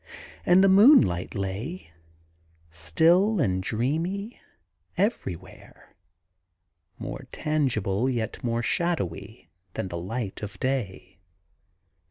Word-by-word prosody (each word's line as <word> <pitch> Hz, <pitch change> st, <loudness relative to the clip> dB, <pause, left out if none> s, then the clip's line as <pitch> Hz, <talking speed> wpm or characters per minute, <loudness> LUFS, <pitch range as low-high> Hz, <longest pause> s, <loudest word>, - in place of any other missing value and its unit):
And 180 Hz, +2 st, +6 dB
the -, -, +6 dB
moonlight 195 Hz, -, +5 dB
lay, 100 Hz, -, -5 dB, 0.8 s
still 170 Hz, -, +3 dB
and 95 Hz, -, +1 dB
dreamy, 165 Hz, -, -2 dB, 0.6 s
everywhere, 185 Hz, -, -4 dB, 1.0 s
more -, -, -7 dB
tangible, 130 Hz, -7 st, 0 dB
yet 115 Hz, -4 st, -3 dB
more 120 Hz, -1 st, -1 dB
shadowy, 110 Hz, -, -3 dB, 0.2 s
than 95 Hz, -, -3 dB
the 85 Hz, -, -4 dB
light 100 Hz, +3 st, -5 dB
of 105 Hz, 0 st, -7 dB
day. 100 Hz, -9 st, -3 dB
120 Hz, 90 wpm, -26 LUFS, -, 1.0 s, And